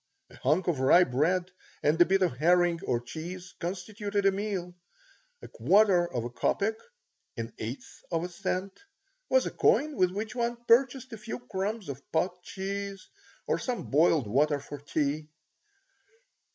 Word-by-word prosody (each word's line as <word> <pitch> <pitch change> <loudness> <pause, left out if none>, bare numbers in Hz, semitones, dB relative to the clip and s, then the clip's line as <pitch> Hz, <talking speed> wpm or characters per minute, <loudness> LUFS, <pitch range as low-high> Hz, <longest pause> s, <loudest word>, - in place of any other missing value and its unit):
A - - -14
hunk 155 +7 +1
of 165 -6 +1
rye 140 +7 +6
bread 175 +7 0 0.3
and 155 +4 +3
a - - +9
bit 190 +1 +2
of 150 -9 0
herring 175 +2 +3
or 120 - +1
cheese 175 +8 -8
constituted 200 +3 -3
a 195 - +6
meal. 195 -3 -3 0.7
A - - -7
quarter 180 - +3
of 120 - -2
a 120 - -4
copeck 200 - 0 0.6
(an 115 0 -5
eighth 115 +5 -7
of 165 -1 0
a - - -2
cent) 185 +2 -3 0.5
was - - +4
a - - -2
coin 300 0 +2
with 185 -5 +3
which 210 +4 -4
one 240 -1 -1
purchased 255 +1 +3
a 225 - -7
few 215 +1 -5
crumbs 210 -2 -4
of 140 -1 -6
pot 180 +2 0
cheese 195 +1 -5 0.4
or - - 0
some 250 -2 -4
boiled 155 -1 +4
water 145 +7 +2
for 145 +1 -8
tea. 145 +1 -2
180 Hz, 160 wpm, -29 LUFS, 150-200 Hz, 0.7 s, a